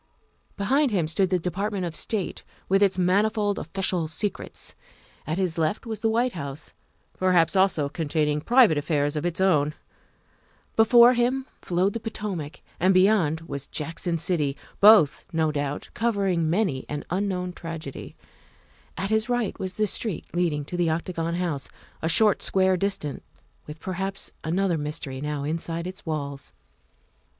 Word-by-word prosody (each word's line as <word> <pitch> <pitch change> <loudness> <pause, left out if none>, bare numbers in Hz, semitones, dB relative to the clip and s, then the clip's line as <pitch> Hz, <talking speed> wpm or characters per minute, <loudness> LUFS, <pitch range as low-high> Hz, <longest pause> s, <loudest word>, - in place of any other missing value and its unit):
Behind 270 +8 +2
him 180 -8 0
stood 185 +4 +1
the 185 - +2
Department 185 +3 -2
of 165 -1 -5
State, 210 -5 -2 0.2
with 195 +1 +3
its 195 -2 +3
manifold 205 +3 +2
official 180 -1 -1
secrets; 195 +5 -5 0.5
at 160 +2 -1
his 180 -4 -1
left 160 +9 0
was 220 -2 -4
the 225 - +1
White 240 +3 +1
House, 140 -4 -5 0.5
perhaps 180 -2 +3
also 190 -6 +3
containing 150 -1 -1
private 230 - +5
affairs 145 -1 0
of 155 +3 -1
its 175 0 -3
own; 155 -6 +2 1.0
before 235 +2 +7
him 255 +2 +1 0.2
flowed 185 +3 +1
the 230 - -3
Potomac, 210 -9 -5 0.2
and 185 +2 +3
beyond 185 -5 +3
was 140 -3 -6
Jackson 165 +2 -3
City, 150 -4 -1 0.2
both, 205 -8 +6
no 160 -2 +1
doubt, 145 -1 -3
covering 200 -8 0
many 175 -7 0
an 150 0 -4
un 195 +3 0
known 180 -2 -3
tragedy; 165 -5 -7 0.8
at 195 +3 -3
his 220 +2 +1
right 245 -4 -1
was 185 -1 -3
the 215 - +1
street 210 -2 -2
leading 165 -5 0
to 175 - -6
the 175 -2 +1
Octagon 165 +1 -2
House, 165 -6 -1 0.3
a 160 - 0
short 210 +4 +5
square 190 -1 +3
distant, 180 -6 -2 0.5
with 150 +1 -8
perhaps 195 +2 -3
another 175 +1 0
mystery 150 -3 -5
now 150 -1 -3
inside 165 +2 -3
its 185 0 -8
walls. 140 - -4
180 Hz, 150 wpm, -25 LUFS, 155-200 Hz, 1.0 s, before